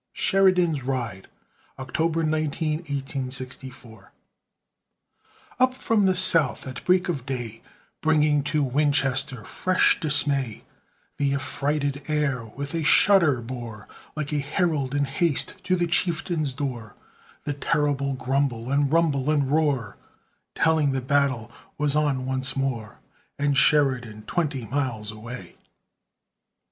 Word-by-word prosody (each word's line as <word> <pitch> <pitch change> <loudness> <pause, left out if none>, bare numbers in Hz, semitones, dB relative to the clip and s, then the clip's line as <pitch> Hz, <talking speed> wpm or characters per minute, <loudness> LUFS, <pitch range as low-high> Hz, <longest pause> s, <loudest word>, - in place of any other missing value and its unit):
SHERIDAN'S 180 -6 +3
RIDE 120 -7 -4 0.5
[October 160 +5 -1
19, 155 0 0
1864] 130 - -6 1.5
Up 255 0 +3
from 225 -5 +1
the 185 - +2
South, 165 -7 +3
at 130 -1 -7
break 180 0 +3
of 150 -8 -2
day, 120 -4 -4 0.4
Bringing 150 -2 +3
to 150 0 +1
Winchester 135 -2 +1
fresh 185 0 +2
dismay, 140 - +1 0.6
The 140 -1 +1
affrighted 140 0 -2
air 150 -5 0
with 140 +6 -7
a 165 - -1
shudder 155 - +4
bore, 115 -4 -7 0.3
Like 150 -1 -3
a 150 - +1
herald 145 -2 -1
in 145 0 +2
haste 145 +3 -1
to 185 0 +2
the 175 -1 +1
chieftain's 170 -4 0
door, 125 -7 -5 0.5
The 145 - -2
terrible 140 -1 0
grumble, 130 -2 -1
and 140 0 +2
rumble, 150 -4 +2
and 145 -3 +1
roar, 145 -9 0 0.6
Telling 155 -4 +2
the 135 - -1
battle 130 -4 0 0.3
was 150 -1 0
on 145 -4 +1
once 130 0 -1
more, 130 -6 -3 0.4
And 145 0 +1
Sheridan 125 -7 +2
twenty 140 -2 -2
miles 120 -5 -2
away. 115 +3 -9
140 Hz, 120 wpm, -25 LUFS, 130-155 Hz, 1.5 s, shudder